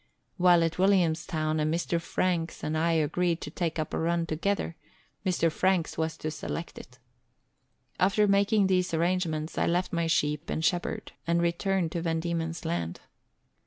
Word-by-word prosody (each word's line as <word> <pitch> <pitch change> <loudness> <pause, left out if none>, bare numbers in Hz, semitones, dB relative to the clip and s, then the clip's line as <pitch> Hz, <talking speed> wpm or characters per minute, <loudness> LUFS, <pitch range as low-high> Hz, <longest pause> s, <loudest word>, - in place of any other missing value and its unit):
While 175 -2 +5
at 165 +1 -1
Williamstown, 165 -4 +2
a - - +1
Mr. 170 +2 0
Franks 170 -1 -1
and 155 - -1
I 165 +1 +2
agreed 165 +2 +1
to 150 - -6
take 165 -1 -2
up 155 -1 -3
a - - 0
run 170 +1 +1
together; 165 +2 -1 0.5
Mr. 175 -4 +1
Franks 185 0 +1
was 160 0 -2
to 155 - -4
select 165 +2 -5
it. 125 - -14 1.0
After 200 +3 +3
making 200 +1 +3
these 180 -2 +1
arrangements, 165 -2 -1
I - - +2
left 175 +2 0
my 170 -1 +1
sheep 150 -1 0
and 160 - -1
shepherd 175 +2 -1 0.2
and 170 0 +2
returned 170 0 0
to 170 - -2
Van 165 -1 0
Diemen's 165 0 -3
Land. 85 -1 -3
170 Hz, 160 wpm, -28 LUFS, 160-180 Hz, 1.0 s, While